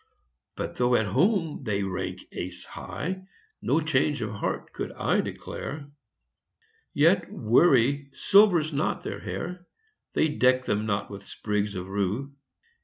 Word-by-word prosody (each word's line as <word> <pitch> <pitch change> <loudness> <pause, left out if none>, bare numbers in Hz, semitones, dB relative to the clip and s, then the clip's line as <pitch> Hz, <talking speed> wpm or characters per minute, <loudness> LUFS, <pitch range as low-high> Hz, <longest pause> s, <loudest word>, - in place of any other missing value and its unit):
But - - -5
though 125 0 +3
at 110 - +3
home 165 - +1
they 100 -4 0
rank 95 -1 -4
ace 90 0 -5
high, 185 +3 -5 0.3
No 145 +7 +2
change 150 -3 +1
of 110 - -3
heart 100 - -3
could - - -4
I - - +1
declare. 145 0 -6 1.0
Yet 170 +4 +3
worry 135 +3 +3
silvers 175 -1 +4
not 145 +2 -1
their - - -4
hair; 180 0 -5 0.5
They 160 - +3
deck 130 -3 +3
them 105 +1 0
not 100 -1 -1
with 100 -1 -9
sprigs 105 -1 -2
of 90 0 -5
rue. 100 +8 -2
130 Hz, 135 wpm, -27 LUFS, 105-160 Hz, 1.0 s, silvers